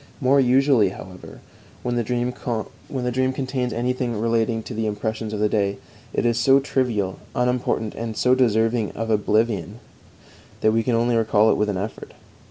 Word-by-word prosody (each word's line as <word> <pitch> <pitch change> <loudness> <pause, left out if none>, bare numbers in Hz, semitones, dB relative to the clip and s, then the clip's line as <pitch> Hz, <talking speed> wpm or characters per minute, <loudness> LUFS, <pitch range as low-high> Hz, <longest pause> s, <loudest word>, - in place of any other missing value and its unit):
More 140 0 +4
usually, 130 -4 +4
however, 95 -1 -11 0.4
when 125 - -1
the 120 - +1
dream 120 +2 -1
contains 130 +2 -3
anything 120 -1 -1
relating 115 0 0
to - - -7
the 110 0 -1
impressions 110 +1 -3
of 105 - -3
the 105 - +3
day, 100 -2 0 0.3
it - - -1
is 120 -1 +2
so 135 +3 +5
trivial, 120 -9 -1 0.2
unimportant, 125 -3 0
and 115 -1 -5
so 125 - +3
deserving 115 -3 +2
of 115 0 -3
oblivion, 110 0 0 0.8
that 110 - +4
we 115 - +3
can 120 +1 0
only 120 +1 +2
recall 110 -1 +3
it - - +2
with 105 0 0
an 100 - -1
effort. 105 +4 -6
115 Hz, 165 wpm, -23 LUFS, 110-125 Hz, 0.8 s, so